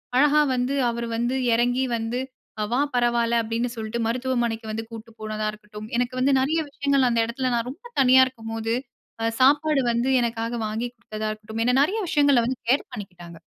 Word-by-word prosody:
அழகா 295 +3 +5
வந்து 250 +2 0
அவரு 235 0 -3
வந்து 240 +3 0 0.2
எறங்கி 245 +2 +2
வந்து, 225 +2 -2 0.5
"வா 250 - +2 0.2
பரவால்ல" 235 -1 +2
அப்டின்னு 230 +2 -2
சொல்ட்டு, 220 +1 -4
மருத்துவமனைக்கு 235 -2 -1
வந்து 225 +1 -4
கூட்டு 230 0 -9
போனதா 215 0 -3
இருக்கட்டும், 210 0 -10
எனக்கு 245 +1 -1
வந்து 270 +2 +3
நிறையா 315 +4 +1
விஷயங்கள் 280 -2 +2
அந்த 235 -1 +2
எடத்துல 255 +2 -2
நான் 235 +1 -1
ரொம்ப 355 - -15 0.2
தனியா 260 0 +7
இருக்கும்போது, 225 -2 -4 0.5
அ - - +1 0.2
சாப்பாடு 290 +2 +4
வந்து 235 +3 0
எனக்காக 230 0 -2
வாங்கிக் 235 +3 -4
குடுத்ததா 215 -1 -5
இருக்கட்டும், 215 +1 -4
என்ன 250 - +3
நிறையா 420 +8 -1
விஷயங்கள 285 -5 +4
வந்து 255 0 -3
கேர் 270 +3 +2
பண்ணிக்கிட்டாங்க. 180 -6 -9
240 Hz, 170 wpm, -24 LUFS, 225-260 Hz, 0.5 s, தனியா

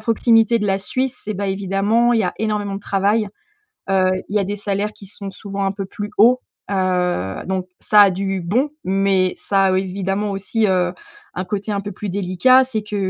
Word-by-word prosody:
proximité 225 +1 +3
de 210 - -1
la 195 0 +1
Suisse, 255 +5 -3
eh 215 - -1
bah 200 +1 -3
évidemment 200 +5 +1
il 230 - +3
y - - +1
a - - -1
énormément 210 -2 -1
de 200 - -5
travail. 205 +2 +1 0.6
Heu, 185 -1 +3 0.2
il 210 - -3
y - - +5
a 200 - +1
des 205 +2 -3
salaires 205 +1 -2
qui 200 - -13
sont 200 0 -7
souvent 200 +1 -5
un 195 - 0
peu 195 -1 -5
plus 205 +1 -6
hauts, 245 +4 +6 0.3
heu, 180 - 0
donc 185 -1 -2
ça 210 - +5
a 200 -2 +7
du 195 +1 -2
bon, 245 - 0
mais 190 -1 +1
ça 195 -1 +1
a 185 0 +2
évidemment 195 +2 -2
aussi, 210 +3 0
heu, 180 -2 +1 0.4
un 185 - -3
côté 200 +3 -4
un 200 - -1
peu 205 0 -6
plus 205 +2 -6
délicat. 200 +8 +4
C'est 235 -4 -3
que, 210 0 -5
200 Hz, 210 wpm, -20 LUFS, 190-210 Hz, 0.6 s, a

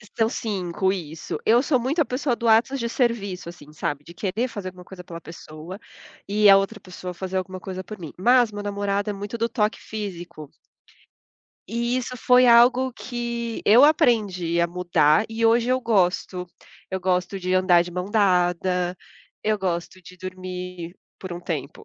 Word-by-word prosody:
São 225 0 +2
5, 190 -4 -1
isso. 160 -4 -6
Eu 235 +3 +4
sou 265 -4 +2
muito 270 +8 -1
a - - +3
pessoa 255 0 -1
do 235 - -3
atos 235 +5 +4
de 235 - -1
serviço, 205 -8 -1
assim, 150 -3 -13
sabe, 145 -1 -3
de 170 - -13
querer 210 +7 -2
fazer 205 -6 -7
alguma 180 -1 -9
coisa 180 -1 -11
pela 170 -1 -8
pessoa 165 +3 -10 0.5
e 210 +1 +3
a 195 - +10
outra 195 +2 -2
pessoa 180 -1 -8
fazer 190 0 -4
alguma 185 0 -4
coisa 185 0 -6
por 215 +3 -9
mim, 165 -6 -9
mas 240 +3 +4
meu 205 - -6
namorado 205 0 -2
é - - -1
muito 205 +3 -6
do 230 +1 0
toque 215 -3 0
físico 175 -8 -7 1.2
e 235 +3 0
isso 250 0 -4
foi 250 +1 +5
algo 245 +2 +5
que 235 -2 -4
eu 230 +6 +7
aprendi 210 - +3
a 170 - +4
mudar 175 -1 +2
e 225 0 0
hoje 230 +1 +3
eu 255 0 +1
gosto. 185 -4 0 0.4
Eu 190 - -2
gosto 180 +1 0
de 185 0 -1
andar 185 -2 +5
de 175 - -9
mão 180 +1 -3
dada, 180 -3 +1 0.5
eu 215 -1 +1
gosto 180 0 -3
de 180 +2 -13
dormir, 180 -1 -7 0.2
por 185 -2 -6
um 175 - -6
tempo, 145 -6 -5
195 Hz, 180 wpm, -24 LUFS, 180-230 Hz, 1.2 s, a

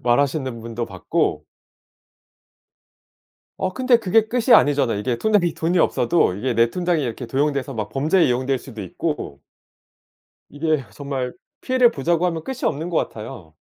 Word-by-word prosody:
말하시는 130 -1 0
분도 115 +1 -4
봤고. 95 -3 -1 2.1
어 185 -1 -1
근데 255 0 +3
그게 220 +1 +2
끝이 245 +1 +3
아니잖아요. 140 -7 +3
이게 120 +3 -1
통장에 200 - +2
돈이 170 +2 0
없어도 165 - +2
이게 120 +4 -2
내 115 +1 +3
통장이 175 -4 0
이렇게 120 0 -4
도용돼서 140 +1 -1
막 105 -2 -3
범죄에 155 - +2
이용될 130 +1 0
수도 115 -5 -10
있고 90 - -4 1.1
이게 150 -2 -1
정말 135 0 -4 0.3
피해를 255 -2 +3
보자고 170 - 0
하면 165 -2 -3
끝이 265 -1 -6
없는 160 +4 -1
것 165 - -1
같아요. 105 -8 -6
140 Hz, 325 characters per minute, -22 LUFS, 120-175 Hz, 2.1 s, 근데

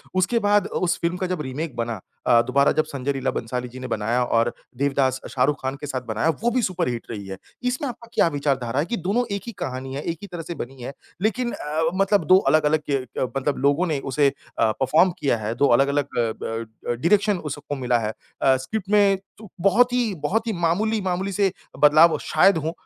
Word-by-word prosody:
उसके 190 +6 +2
बाद 205 -2 +3
उस 175 -1 0
फिल्म 170 +1 0
का 185 - -2
जब 180 -3 -2
रीमेक 145 +1 -5
बना 115 -2 -3 0.3
अ, 120 -2 +6
दोबारा 140 +3 +3
जब 155 - +4
संजय 140 0 -3
लीला 135 -1 -1
भंसाली 125 +2 -3
जी 130 +2 -10
ने 130 - -6
बनाया 115 +2 0
और 115 0 +1 0.3
देवदास 135 -1 +1
अ, - - -7
शाहरुख 135 +3 0
खान 130 +1 -2
के 145 - -5
साथ 130 -2 -3
बनाया, 115 +8 0
वो 240 - +4
भी 250 +1 +1
सुपरहिट 170 - -2
रही 100 -3 -6
है। 95 0 -6 0.3
इसमें 250 +3 -1
आपका 235 -1 -10
क्या - - +4
विचारधारा 135 -4 -1
है 150 - +1
कि 235 +5 -3
दोनों 200 +8 0
एक 200 - -4
ही - - -3
कहानी 130 +1 -4
है, 140 - -3
एक 165 +2 -3
ही 205 - -8
तरह 175 -3 -6
से 170 +1 -6
बनी 130 -1 -7
है 125 - -6 0.3
लेकिन 235 +4 0
अ - - -5
अ, 155 +2 0
मतलब 195 +1 +2
2 185 - +8
अलग-अलग 155 0 +3
ये 140 - +2 0.2
अ, - - +1
मतलब 140 +1 -1
लोगों 155 +6 +2
ने 155 -4 -1
उसे 140 +1 +4
अ, 115 -4 -2
परफॉर्म 155 +10 +3
किया 135 -6 +1
है। 110 0 -3
2 140 +3 +3
अलग-अलग 140 +1 0
अ, 115 -2 +1
ब 115 0 -4 0.2
अ, - - +1
डायरेक्शन 195 - +2
उस 150 -5 -5
सबको 145 0 -6
मिला 125 -3 +1
है। 110 -2 -2 0.3
अ, 135 - +5
स्क्रिप्ट 190 +10 -5
में 200 -2 +4 0.2
चु 215 -2 -12
बहुत 235 +7 +4
ही, 240 -4 +1
बहुत 220 +9 0
ही 225 - 0
मामूली, 215 +6 +1
मामूली 190 +1 -2
से 195 -1 +1 0.3
बदलाव 155 +3 +7
अ, - - -2
शायद 170 +4 +4
हों। 160 +1 -2
150 Hz, 230 wpm, -23 LUFS, 130-190 Hz, 0.3 s, 2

